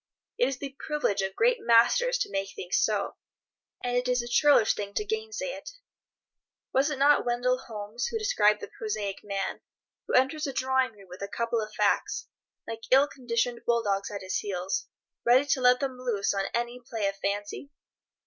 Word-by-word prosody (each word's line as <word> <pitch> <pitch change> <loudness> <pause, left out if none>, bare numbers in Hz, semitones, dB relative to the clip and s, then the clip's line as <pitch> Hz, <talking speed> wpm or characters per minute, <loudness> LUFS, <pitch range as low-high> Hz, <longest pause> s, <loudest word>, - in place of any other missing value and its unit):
It 245 - +4
is 270 -1 -3
the 275 0 -7
privilege 295 -10 0
of 190 0 -3
great 485 +1 +3
masters 450 - +4
to - - -2
make 195 0 -2
things 180 0 -1
so, 205 -2 0 0.7
and 245 0 -1
it 245 0 +1
is 250 -1 +1
a - - -7
churlish 280 -2 +5
thing 200 -1 -6
to 425 - 0
gainsay 440 +3 -3
it. - - -8 1.0
Was 270 +3 +3
it 295 - -3
not 285 +2 +5
Wendell 245 +1 +1
Holmes 220 -1 -5
who 455 - -2
described 210 - +3
the - - -5
prosaic 210 - -3
man, 200 -1 -3 0.5
who - - 0
enters 275 +4 +2
a 275 - -4
drawing 260 -2 +1
room 200 -2 -17
with 180 +2 -11
a 200 - -3
couple 230 +2 -1
of 215 0 -6
facts, - - +1 0.4
like 225 0 -5
ill 270 +2 +6
conditioned 240 -3 -2
bull 235 -1 +3
dogs 200 -1 -1
at 200 -2 -6
his 185 - -1
heels, 190 -2 -3 0.4
ready 250 +4 +5
to 285 -2 +1
let 250 0 +5
them 265 -2 -3
loose 230 -7 0
on 195 -1 -1
any 240 +1 -2
play 230 -3 -4
of 195 - -2
fancy? 205 +7 -3
240 Hz, 190 wpm, -28 LUFS, 205-270 Hz, 1.0 s, ill